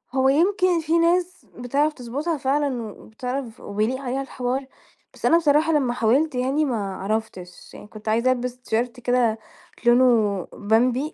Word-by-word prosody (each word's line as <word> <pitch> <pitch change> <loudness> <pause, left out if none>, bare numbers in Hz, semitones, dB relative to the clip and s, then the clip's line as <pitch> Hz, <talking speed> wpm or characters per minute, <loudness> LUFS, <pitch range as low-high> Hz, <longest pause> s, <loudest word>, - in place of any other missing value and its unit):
هو 265 0 +3
يمكن 360 +4 +2
في 320 +2 +1
ناس 355 +2 +1
بتعرف 280 +5 0
تضبطها 285 +6 -3
فعلًا 270 -2 0
و - - -15
وبتعرف 250 +1 -6
وبيليق 215 +6 -2
عليها 265 +1 -2
الحوار، 260 0 -3 0.5
بس - - -7
أنا 335 - +5
بصراحة 315 0 +3
لما 265 -5 +1
حاولت 255 +6 +1
يعني 270 +5 +1
ما 205 -8 -3
عَرفتش، 195 -3 -5
يعني - - -12
كنت 215 0 -8
عايزة 235 +4 +2
البس 250 0 -3
تيشيرت 245 +1 -2
كده 245 -2 +1 0.5
لونه 235 -6 +3
بمبي 245 +7 +1
250 Hz, 150 wpm, -23 LUFS, 225-290 Hz, 0.5 s, أنا